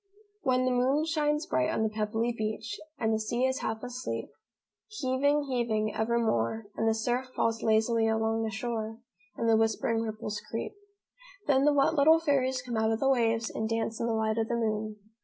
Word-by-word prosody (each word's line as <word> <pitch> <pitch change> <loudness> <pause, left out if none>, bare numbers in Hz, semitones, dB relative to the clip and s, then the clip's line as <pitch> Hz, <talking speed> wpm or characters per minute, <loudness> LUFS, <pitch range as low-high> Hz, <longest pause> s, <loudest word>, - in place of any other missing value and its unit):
"When 255 -3 +2
the 255 - +2
moon 260 +5 +2
shines 300 -1 0
bright 130 -1 +1
on 220 - 0
the 220 - +1
pebbly 220 +2 -1
beach 215 -1 -4 0.2
And 220 -3 +1
the 220 - +1
sea 235 +4 0
is 260 0 0
half 220 +1 -3
asleep; 250 +1 -4 0.6
Heaving, 285 -6 +1
heaving, 235 -5 -1
evermore, 220 - 0
And 225 - +1
the 220 - +2
surf 245 +3 -1
falls 225 -1 0
lazily 225 +1 +2
along 220 0 +1
the 225 - -1
shore, 220 -1 -3 0.4
And 230 - -1
the 225 - +5
whispering 225 +1 +1
ripples 215 -1 -4
creep. 225 - -4 0.7
Then 275 -1 +3
the 295 - +5
wet 285 +2 +3
little 315 +1 +6
fairies 265 -5 +1
come 240 -3 -3
out 220 0 +2
of 225 - 0
the 270 - +2
waves 230 -3 +1
And 220 0 -2
dance 225 0 -1
in 230 - 0
the 230 - 0
light 220 0 0
of 225 - 0
the 235 - -1
moon. 215 -2 -1
230 Hz, 195 wpm, -29 LUFS, 220-255 Hz, 0.7 s, little